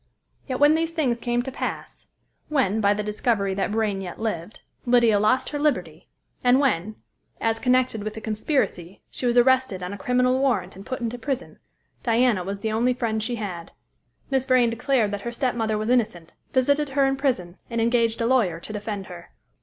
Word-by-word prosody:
Yet 255 -2 -3
when 290 +1 +6
these 325 +1 +1
things 285 -8 0
came 240 0 0
to 265 - -5
pass; - - -6 0.4
when, 235 -8 +1
by 205 0 +3
the 210 - -2
discovery 210 -1 0
that 195 +1 -1
Vrain 210 -2 0
yet 180 -2 -7
lived, 210 -3 -4 0.3
Lydia 235 -4 +4
lost 215 +5 +2
her 290 - -4
liberty; 180 - -1 0.4
and 250 +1 +5
when, 215 -7 0 0.4
as 225 0 0
connected 250 -3 +1
with 215 0 -5
the - - -5
conspiracy, 215 - -2
she 250 - -2
was 240 0 +2
arrested 255 -6 +3
on 180 +2 -4
a 205 - -8
criminal 250 +3 +2
warrant 270 -2 0
and 195 +1 -11
put 260 -1 -4
into 235 +1 -3
prison, 265 +2 -4 0.4
Diana 230 -4 +2
was 200 +2 -5
the 220 - -1
only 240 +3 +1
friend 225 -3 -1
she 240 +3 -2
had. 185 -7 -6 0.6
Miss 265 -1 +1
Vrain 250 -3 +4
declared 235 -2 +1
that 205 -1 -4
her 235 - -4
stepmother 235 -4 -1
was 215 +3 -1
innocent, 195 -9 0 0.2
visited 285 +3 +2
her 275 0 +2
in 270 0 +1
prison, 235 -11 -2
and 230 -1 -2
engaged 230 0 +2
a - - +1
lawyer 225 -10 +2
to 215 - -8
defend 205 -2 -4
her. 175 -2 -11
230 Hz, 195 wpm, -24 LUFS, 205-255 Hz, 0.6 s, when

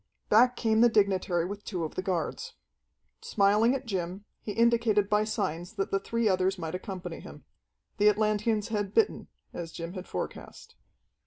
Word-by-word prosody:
Back 245 +3 +5
came 220 -1 +2
the 240 - +7
dignitary 190 -5 +2
with 205 +2 -6
two 180 -5 -4
of 155 - -4
the - - -2
guards. 180 -3 -3 0.7
Smiling 210 +5 +3
at 270 - -5
Jim, 190 -1 -4 0.2
he 210 - -5
indicated 225 -2 +2
by 210 0 +3
signs 175 -2 -3
that 195 -3 -3
the 195 - +2
three 230 +3 -1
others 190 0 +1
might 165 -2 -5
accompany 185 0 -6
him. - - -12 0.5
The 210 0 +5
Atlanteans 215 +1 +1
had 205 -2 -2
bitten, 435 - +2 0.3
as 170 -2 -6
Jim 170 +1 -6
had 185 -1 -7
forecast. - - -7
205 Hz, 165 wpm, -28 LUFS, 185-220 Hz, 0.7 s, the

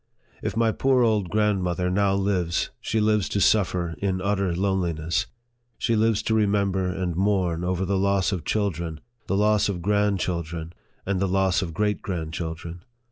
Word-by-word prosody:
If 105 - -3
my 115 -1 +3
poor 130 +1 +2
old 105 -5 +1
grandmother 90 -4 +1
now 100 +1 +2
lives, 95 -4 0
she 110 - -1
lives 105 -2 +2
to 100 - -1
suffer 90 -5 +2
in 95 -2 -1
utter 95 -2 0
loneliness; 85 -2 0 0.5
she 115 - +1
lives 110 -1 +2
to 110 - 0
remember 100 -3 +1
and 90 -2 -2
mourn 95 -3 +1
over 90 +1 -1
the 95 +1 0
loss 100 0 +2
of 90 -6 -3
children, 85 -7 -2 0.3
the 95 - 0
loss 105 0 +3
of 90 -4 -4
grandchildren, 90 -5 -1 0.3
and 95 -1 0
the 100 - +1
loss 95 +1 +2
of 85 -4 -5
great 105 +1 0
grandchil 80 -2 -4
dren. 85 +1 -9
95 Hz, 165 wpm, -25 LUFS, 90-105 Hz, 0.5 s, my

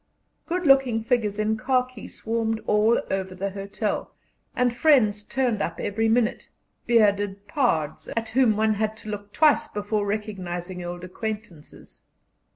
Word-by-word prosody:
Good 355 +1 -2
looking 265 -5 +4
figures 225 -4 0
in 215 +1 0
khaki 255 -2 -1
swarmed 225 0 -2
all 215 +2 +3
over 190 -1 -2
the 195 +2 -3
hotel, 200 +2 -4 0.4
and 245 -1 +1
friends 235 -8 +4
turned 245 -2 0
up 170 - -3
every 225 +2 0
minute 235 +1 +1 0.4
bearded 205 -3 +2
pards, 165 - 0
at 225 -1 -1
whom 230 -3 +3
one 220 0 +3
had 215 +1 -2
to - - -6
look 205 -1 -6
twice 300 +2 +4
before 205 -5 -2
recognizing 185 -4 -4
old 175 0 -6
acquaintances. 205 -3 -7
215 Hz, 140 wpm, -25 LUFS, 200-240 Hz, 0.4 s, looking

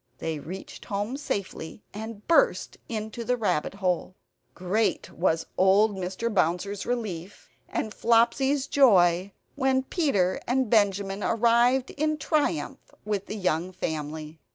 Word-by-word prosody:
They 160 -2 -3
reached 180 +6 -9
home 205 +5 -2
safely, 200 - -5
and 215 0 -8
burst 400 +9 +3
into 220 +1 -4
the 250 +2 0
rabbit 200 -6 -1
hole. 185 -2 -1 0.4
Great 195 +5 0
was 165 -2 0
old 195 +3 +5
Mr. 190 +5 -3
Bouncer's 190 +2 0
relief 205 -7 -4 0.2
and 215 - -3
Flopsy's 240 +4 +2
joy 190 -9 +4 0.2
when 265 -1 +1
Peter 260 - +1
and 250 -1 +1
Benjamin 200 -2 +2
arrived 240 +3 +3
in 310 +1 -1
triumph 285 - -1
with 205 -2 -2
the 215 - -5
young 180 -2 0
family. 155 -3 -5
205 Hz, 125 wpm, -26 LUFS, 185-240 Hz, 0.4 s, old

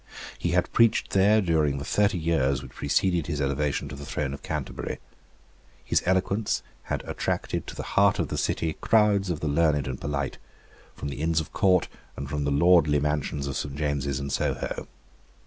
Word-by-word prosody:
He - - -1
had - - +1
preached 115 -1 +3
there 105 +3 +4
during 80 -6 +1
the 70 - -5
thirty 100 -2 +2
years 70 -6 +1
which 65 - -10
preceded 85 +4 0
his 75 -3 -2
elevation 70 0 -1
to 65 - -7
the 70 - -9
throne 70 0 -3
of 70 - -8
Canterbury. - - -4 0.9
His - - +2
eloquence 95 +3 +1 0.2
had - - -3
attracted - - -2
to - - -7
the - - -5
heart - - +3
of - - -1
the - - -3
City 80 -1 -1
crowds 105 -3 +3
of 80 -3 -2
the 80 - -1
learned 75 -1 +2
and 65 0 -5
polite, 70 -2 -3 0.6
from 70 - -5
the 70 - -5
Inns 80 0 +2
of 80 0 -6
Court 90 -2 +3 0.3
and 70 - -5
from 70 +1 -2
the 70 - 0
lordly 75 -1 +5
mansions 75 -1 -1
of 70 -1 -3
Saint 70 -1 -3
James's 70 -2 -1
and 70 0 -4
Soho. - - -2
75 Hz, 185 wpm, -26 LUFS, 70-90 Hz, 0.9 s, lordly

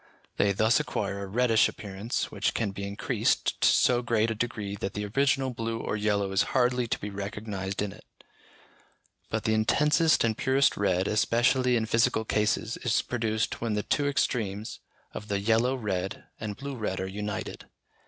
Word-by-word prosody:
They 100 - +3
thus 110 +6 +3
acquire 100 -8 -3
a 100 - -5
reddish 115 +2 +3
appearance 100 +3 -4
which - - -1
can 105 -3 0
be 100 +1 -5
increased 100 0 0
to - - +5
so 120 -1 +4
great 115 -1 +1
a - - +1
degree 105 -3 -3
that 95 - -4
the 105 0 -2
original 135 +4 +1
blue 115 -1 -3
or - - -2
yellow 105 -2 0
is 95 - +3 0.2
hardly 125 -1 +2
to - - -1
be 105 - -6
recognised 100 -1 -4
in 105 - -3
it: 105 - -14 1.3
but - - -2
the 110 - +1
intensest 150 +8 +3
and 115 -1 +1
purest 135 +4 +2
red, 95 -2 +1
especially 120 +3 +2
in 115 -2 +1
physical 115 0 +2
cases, 105 +1 0
is 115 -3 +1
produced 110 -2 -2
when 115 -2 -1
the 105 - -1
two 145 -1 0
extremes 110 -6 -1 0.3
of 105 - -7
the 100 -1 -1
yellow 115 +5 +2
red 95 -6 -3 0.2
and 105 -2 -5
blue 140 +1 -5
red 105 -5 -3
are 95 - -2
united. 100 0 -5
110 Hz, 175 wpm, -28 LUFS, 100-120 Hz, 1.3 s, to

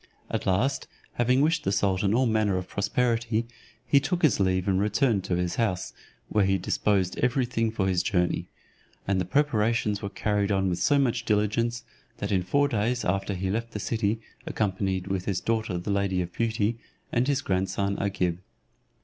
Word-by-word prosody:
At - - -2
last, 125 +9 +1 0.3
having 125 +2 +2
wished 160 +3 +2
the 95 - 0
sultan 100 0 +1
all 130 +2 +3
manner 110 -4 +2
of 90 - -4
prosperity, 115 +1 0 0.4
he 140 - +5
took 175 +5 -2
his 155 - +4
leave 95 -1 +1
and 95 -1 +2
returned 105 0 +1
to 95 - 0
his 90 0 -1
house, 95 -6 -1 0.3
where 105 - +2
he 95 0 +2
disposed 95 -2 0
every 125 +1 +2
thing 115 -2 0
for 105 -3 -1
his 90 -2 +2
journey; 90 -3 0 0.6
and 95 -1 +1
the - - -2
preparations 110 -3 +1
were 100 - -3
carried 105 0 0
on 95 -1 +1
with 85 - -2
so 145 - +3
much 125 -3 +1
diligence, 115 +2 0 0.3
that 100 - -3
in 95 -2 +2
four 140 +11 +2
days 120 -1 -1
after 95 +2 -1
he 95 +1 -2
left 115 +2 -3
the 105 - -3
city, 110 0 -1 0.3
accompanied 95 -3 -1
with 95 -2 -2
his 95 -3 0
daughter 110 -5 -1
the 90 +4 -3
lady 100 -2 +1
of 85 - -9
beauty, 115 0 0 0.3
and 120 +2 +1
his 145 0 +1
grandson 95 0 0
Agib. 90 -3 -1
105 Hz, 185 wpm, -27 LUFS, 95-115 Hz, 0.6 s, he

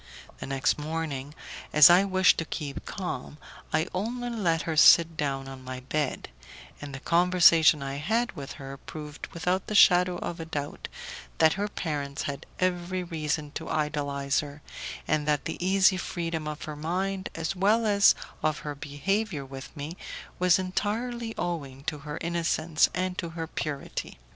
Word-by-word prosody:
The - - -6
next 135 +2 +1
morning, 150 -2 -4 0.4
as 150 -1 +9
I 180 +3 +6
wished 185 -1 +4
to 165 - -2
keep 145 -3 -5
calm, 175 -7 -5 0.3
I 155 +1 +1
only 240 +6 -2
let 175 -8 0
her 160 - -2
sit 165 +1 +7
down 135 -3 -2
on 135 -1 -9
my 130 0 -6
bed, 145 +2 -2 0.5
and 145 -1 -7
the - - -6
conversation 170 -2 +5
I 135 0 -4
had 225 +11 0
with 140 -6 -8
her 135 -1 -8
proved 150 +1 -8
without 180 +3 -1
the 210 - -3
shadow 180 -2 +6
of 170 0 -5
a 165 - -5
doubt 145 -3 -5 0.5
that 160 -1 +5
her 205 +2 -2
parents 145 -8 -3
had 140 +1 -5
every 185 0 -1
reason 155 -3 -3
to 160 +2 -6
idolize 145 -2 0
her, 145 0 -7 0.4
and 155 -1 +1
that 150 -1 +1
the - - -4
easy 190 0 +4
freedom 165 -3 -3
of 150 0 -5
her 150 - -6
mind 185 +5 -2
as 165 +3 -2
well 210 +5 +3
as 200 -1 +6 0.3
of 155 -1 +1
her 150 - -3
behaviour 150 +4 -2
with 135 +3 -10
me 150 +5 -6 0.4
was 180 -1 +5
entirely 225 +5 -2
owing 140 -6 -4
to 150 0 -3
her 150 +2 -6
innocence 170 -1 +1
and 185 0 -2
to 170 - -3
her 165 - -2
purity. 150 -3 -5
160 Hz, 165 wpm, -27 LUFS, 145-185 Hz, 0.5 s, as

